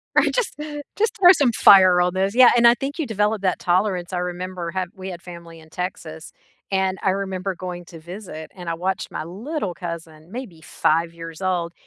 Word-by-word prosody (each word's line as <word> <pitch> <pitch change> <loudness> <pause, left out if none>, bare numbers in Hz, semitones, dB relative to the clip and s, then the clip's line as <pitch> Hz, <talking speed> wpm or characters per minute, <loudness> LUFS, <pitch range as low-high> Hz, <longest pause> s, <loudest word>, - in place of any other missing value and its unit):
I - - +5
just - - -1 0.4
just 445 +2 0
throw 360 -2 +9
some 285 -9 +3
fire 190 -4 +7
on 180 0 +1
this 195 +3 0
Yeah, 255 -1 +8
and 240 0 +6
I 235 - +6
think 275 +5 -5
you 320 - 0
develop 210 -1 0
that 185 -2 0
tolerance, 185 0 0
I - - -1
remember 180 -1 -4
have 185 0 -3
we 190 0 -7
had 175 -2 -8
family 170 -2 -11
in 160 0 -17
Texas, 160 -3 -6 0.4
and 190 -1 +1
I - - +1
remember 190 -1 -3
going 175 0 -7
to 165 -1 -12
visit 170 -2 -9
and 180 -3 -7
I 165 - -1
watched 185 +2 -3
my - - -4
little 205 - -4
cousin, 170 -2 -8
maybe 220 -9 -8
5 165 +1 0
years 165 0 -9
old, 175 -3 -1
185 Hz, 200 wpm, -22 LUFS, 170-200 Hz, 0.4 s, throw